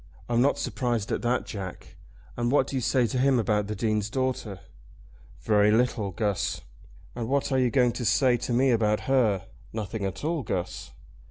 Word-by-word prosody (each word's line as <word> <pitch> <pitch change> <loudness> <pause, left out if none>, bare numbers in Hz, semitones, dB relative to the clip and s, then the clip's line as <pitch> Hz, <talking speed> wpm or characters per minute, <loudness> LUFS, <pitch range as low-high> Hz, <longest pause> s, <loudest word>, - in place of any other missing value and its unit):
"I'm 120 0 +2
not 140 +3 +3
surprised 120 -5 -2
at - - -1
that, 120 +1 0
Jack. 95 -4 -8 0.4
And 120 0 -1
what 140 -1 +4
do 135 - -6
you 130 - 0
say 125 +1 +2
to 125 +2 -2
him 135 0 +3
about 105 -3 +1
the 105 - -3
Dean's 105 0 0
daughter?" 130 -6 -2 0.8
"Very 105 -1 +3
little, 110 -2 +1
Guss." 100 +1 -2 0.5
"And 120 -1 -4
what 140 +1 0
are 130 - +2
you 125 -1 +3
going 125 -1 +3
to 120 - -4
say 125 +2 +4
to 120 - -4
me 130 +2 +3
about 105 -2 +2
her?" 110 -8 +1 0.3
"Nothing 110 -1 -4
at 95 +5 -4
all, 160 0 0
Guss." 95 -6 -4
120 Hz, 185 wpm, -27 LUFS, 105-130 Hz, 0.8 s, what